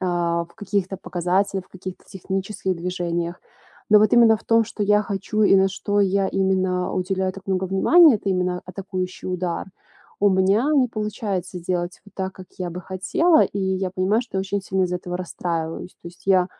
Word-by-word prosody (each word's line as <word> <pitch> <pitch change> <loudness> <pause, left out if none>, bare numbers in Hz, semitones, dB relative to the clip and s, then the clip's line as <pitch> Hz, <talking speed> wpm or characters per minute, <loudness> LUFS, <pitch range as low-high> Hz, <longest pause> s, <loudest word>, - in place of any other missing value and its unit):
э, - - -2
в 170 -1 0
каких-то 200 -2 -2
показателях, 185 +2 -1
в - - -31
каких-то 185 0 -9
технических 190 0 -3
движениях. 175 0 -3 0.5
Но 210 - +7
вот 215 +1 +3
именно 230 -2 +6
в - - -17
том, 230 0 +4
что 210 -1 -5
я 210 +1 +4
хочу 205 +2 -2
и 195 - +6
на 190 0 +4
что 205 +1 -2
я 195 0 +2
именно 185 -1 0
уделяю 185 0 -1
так 195 0 -12
много 190 0 0
внимания, 275 - +6
это 200 - -5
именно 180 -1 0
атакующий 185 -1 -5
удар. 180 -1 -2 0.5
У 205 - +5
меня 195 +8 +3
не 260 -3 +4
получается 205 -4 -3
сделать 175 0 -3
вот 205 - -17
так, 190 0 -3
как 185 - -11
я 180 -2 -3
бы 180 +2 -6
хотела, 310 - +2
и 200 - -2
я 190 -1 -1
понимаю, 190 +6 +1
что 195 - -5
очень 195 +1 -2
сильно 190 0 0
из-за 180 0 -1
этого 180 0 -5
расстраиваюсь. 170 -1 -4
То 170 - -7
есть 175 - -18
я, 185 -2 +4
190 Hz, 190 wpm, -23 LUFS, 180-200 Hz, 0.5 s, Но